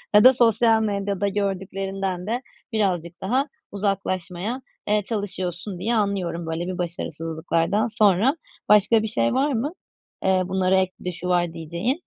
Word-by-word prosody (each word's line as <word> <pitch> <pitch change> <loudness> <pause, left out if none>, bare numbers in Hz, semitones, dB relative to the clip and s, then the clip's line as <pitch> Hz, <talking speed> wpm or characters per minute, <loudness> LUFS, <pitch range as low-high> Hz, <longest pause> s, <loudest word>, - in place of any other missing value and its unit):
ya 210 - +8
da 255 - +9
sosyal 225 -2 +4
medyada 200 -1 -1
gördüklerinden 195 -1 -2
de 240 +3 -1 0.3
birazcık 180 -6 -1
daha 255 +9 +1 0.2
uzaklaşmaya, 195 +2 -2 0.3
eee, 210 0 +3
çalışıyorsun 185 -3 -4
diye 235 +4 0
anlıyorum 190 -5 -1
böyle 165 +2 -3
bir 185 - -3
başarısızlıklardan 165 +3 -1
sonra. 215 - +3 0.3
Başka 210 +2 +6
bir 220 - 0
şey 115 - +1
var 285 +2 +2
mı? 250 +6 -1 0.5
Eee, 190 -1 +4
bunlara 190 0 +2
ek 185 -1 +2
bir - - -14
de 180 - 0
şu 180 +1 -6
var 175 -2 +2
diyeceğin? 170 - -2
195 Hz, 150 wpm, -24 LUFS, 175-215 Hz, 0.5 s, da